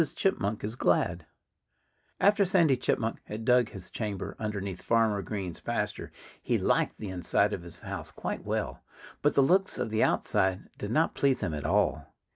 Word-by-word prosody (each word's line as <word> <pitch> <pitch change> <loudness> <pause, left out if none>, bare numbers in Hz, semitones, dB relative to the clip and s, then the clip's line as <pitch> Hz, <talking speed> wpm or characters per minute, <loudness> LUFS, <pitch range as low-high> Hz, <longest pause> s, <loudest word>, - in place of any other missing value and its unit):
CHIPMUNK 105 - 0
IS 110 +3 -3
GLAD 90 -5 +1 0.9
After 205 +1 +5
Sandy 175 -7 +4
Chipmunk 115 -2 -1
had 110 +1 -6
dug 125 -2 +4
his 95 -2 -10
chamber 105 -4 -4
underneath 100 -4 -4
Farmer 115 -3 +2
Green's 95 -4 -5
pasture, - - -3 0.3
he - - +1
liked - - +1
the 105 - -6
inside 95 +3 +1
of 90 - -3
his 85 -1 -10
house - - -5
quite - - -5
well. - - -2 0.4
But 145 - +2
the 140 - +6
looks 190 +7 +3
of - - -2
the 110 - +1
outside 95 0 +1
did 105 - -4
not 155 +8 +2
please 135 -2 +2
him 90 -6 -1
at 75 -1 -4
all. - - +1
105 Hz, 170 wpm, -29 LUFS, 95-130 Hz, 0.9 s, the